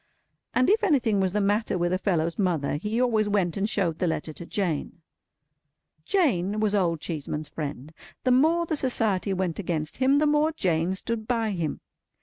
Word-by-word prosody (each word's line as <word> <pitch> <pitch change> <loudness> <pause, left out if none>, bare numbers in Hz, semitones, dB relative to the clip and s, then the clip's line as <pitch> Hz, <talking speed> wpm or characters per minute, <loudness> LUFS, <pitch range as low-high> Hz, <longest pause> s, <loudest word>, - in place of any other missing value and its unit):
And 255 - +3
if 435 +2 +3
anything 255 - +2
was 190 -1 +1
the 210 - 0
matter 205 0 +1
with 175 0 0
a 185 - 0
fellow's 170 -3 0
mother, 165 -7 0
he 210 +8 -2
always 220 -4 +2
went 190 -5 +1
and 205 +2 -1
showed 170 -7 0
the 180 - +1
letter 160 -1 -2
to 170 - -9
Jane. 170 -3 -3 1.0
Jane 215 - +1
was 215 -1 +1
Old 175 -5 +1
Cheeseman's 150 -2 -4
friend. 150 -1 -6 0.3
The 255 - +2
more 320 +7 +4
the 315 - -1
Society 220 -8 0
went 185 -2 -2
against 160 -5 -3
him, 265 +2 +3
the 305 - +3
more 300 +1 +2
Jane 180 - 0
stood 220 +2 -3
by 230 -3 0
him. 165 -6 -3
195 Hz, 180 wpm, -26 LUFS, 170-240 Hz, 1.0 s, more